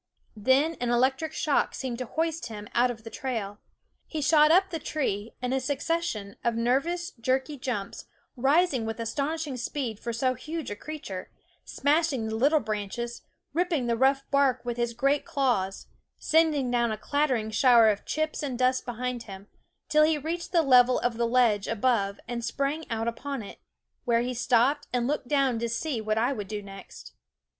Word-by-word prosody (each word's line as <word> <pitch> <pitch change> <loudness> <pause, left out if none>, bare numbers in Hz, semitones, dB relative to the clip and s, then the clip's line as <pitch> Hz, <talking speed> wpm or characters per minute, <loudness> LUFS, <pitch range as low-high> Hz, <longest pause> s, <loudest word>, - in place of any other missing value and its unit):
Then 265 +9 +2
an 245 - 0
electric 265 +6 +1
shock 300 -2 0
seemed 255 -3 -4
to 255 - -4
hoist 320 -1 -2
him 210 -2 -8
out 245 +1 +3
of 230 -2 -6
the 225 - -9
trail. 215 -6 -4 0.5
He 315 - -4
shot 300 +1 +5
up 375 +3 +4
the 330 - -3
tree 230 -9 -3
in 250 +1 0
a 265 - +2
succession 275 -6 -2
of 235 -1 +1
nervous, 275 +10 0
jerky 260 +5 -1
jumps, 245 -7 -4 0.3
rising 275 +1 +2
with 225 +1 -4
astonishing 280 +4 -2
speed 240 -3 -3
for 235 - -4
so 255 +3 +1
huge 315 0 -6
a - - -3
creature, 205 -8 -7 0.4
smashing 285 -4 +1
the 220 0 -3
little 285 +7 +4
branches, 220 +1 -4 0.3
ripping 335 -5 0
the 235 -1 +1
rough 270 +3 +3
bark 280 -3 +2
with 240 -1 -2
his 235 -1 -1
great 275 +4 +2
claws, 235 -9 -1 0.3
sending 310 -5 +2
down 235 -2 +2
a 215 - -2
clattering 260 -7 0
shower 235 -1 +6
of 205 -1 -1
chips 310 0 -2
and 270 -4 -3
dust 255 +1 +1
behind 245 0 -3
him, 195 +1 -10 0.4
till 305 0 +4
he 310 0 +3
reached 335 +4 -4
the 340 -3 +4
level 250 -2 +6
of 245 -2 -1
the 235 0 +1
ledge 230 -4 +3
above 215 -3 0
and 235 -1 -4
sprang 280 +6 -2
out 225 0 -2
upon 265 +1 -4
it; 200 - -11 0.5
where 235 -2 +3
he 250 +1 -2
stopped 250 +4 +2
and 245 -1 0
looked 280 -1 -2
down 270 -5 +2
to 235 0 -2
see 235 +1 -2
what 215 0 -1
I 240 +5 +2
would 205 -6 -5
do 210 0 -5
next. 195 0 -11
250 Hz, 180 wpm, -27 LUFS, 230-290 Hz, 0.5 s, shower